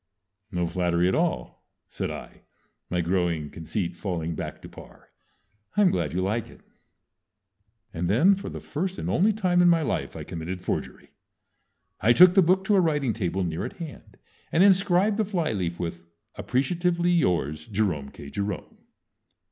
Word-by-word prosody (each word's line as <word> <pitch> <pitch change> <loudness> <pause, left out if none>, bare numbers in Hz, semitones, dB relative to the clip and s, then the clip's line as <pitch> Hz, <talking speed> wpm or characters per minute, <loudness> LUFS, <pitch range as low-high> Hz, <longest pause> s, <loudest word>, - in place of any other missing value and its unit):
"_ - - -6
"No 90 0 +1
flattery 85 0 +1
at 95 - +1
all," 60 -2 -1 0.2
said - - -4
I, - - -9 0.5
my 90 -1 0
growing 85 -4 -1
conceit 85 +2 -3
falling 85 -3 -3
back - - -6
to - - -8
par. - - -15 0.7
"I'm 205 -3 +5
glad 85 -4 -1
you 90 - +1
like 105 +3 -1
it." - - -16 1.3
And 85 +1 -2
then 155 - +5
for 195 +1 -4
the - - -7
first 185 +5 -4
and - - -3
only 205 +5 +3
time 185 -4 +2
in 175 - +6
my 165 -2 +3
life - - -2
I - - -6
committed 85 +3 -5
forgery. - - -4 0.9
I 115 +3 +4
took 180 +5 +8
the 195 - +6
book 185 +2 +3
to 205 +1 +2
a 190 - +5
writing 150 -8 +1
table 95 -3 -2
near 85 -1 -3
at - - -5
hand, 165 -4 -10 0.3
and 170 - +4
inscribed 195 +1 +4
the 220 - +2
flyleaf 115 - -2
with 85 -1 -4 0.3
"Appreciatively 170 - 0
yours, 85 - 0
Jerome 95 -10 -1
K. 70 0 -11
Jerome." 100 -1 -4
105 Hz, 165 wpm, -26 LUFS, -, 1.3 s, took